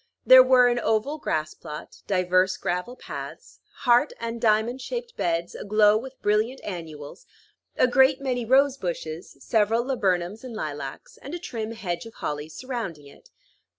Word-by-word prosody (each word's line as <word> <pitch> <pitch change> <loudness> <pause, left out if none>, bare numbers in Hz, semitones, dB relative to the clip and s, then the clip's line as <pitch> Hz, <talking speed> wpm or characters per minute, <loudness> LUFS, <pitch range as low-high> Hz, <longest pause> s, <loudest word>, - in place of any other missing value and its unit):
There 255 0 +10
were 255 -1 +6
an 240 0 +1
oval 240 +7 0
grass 155 - -2
plot, 150 -2 -10
divers 185 0 +2
gravel 180 +8 -3
paths, - - -9 0.3
heart 240 -1 +4
and 230 0 -4
diamond 225 +3 +2
shaped 475 - -5
beds 170 0 -1
aglow 210 0 +3
with 260 +4 -5
brilliant 215 +5 +1
annuals, 165 -4 -8 0.5
a - - +5
great 260 +2 +4
many 255 -3 -2
rose 270 +3 +3
bushes, 170 -4 -5
several 225 +1 +1
laburnums 200 -5 -1
and 250 -3 -8
lilacs, 145 -7 -6
and 285 +5 -8
a - - -5
trim 230 -9 -5
hedge 180 -3 -4
of 225 - -14
holly 150 +1 -4
surrounding 195 - -6
it. 140 - -17
220 Hz, 150 wpm, -25 LUFS, 175-255 Hz, 0.5 s, There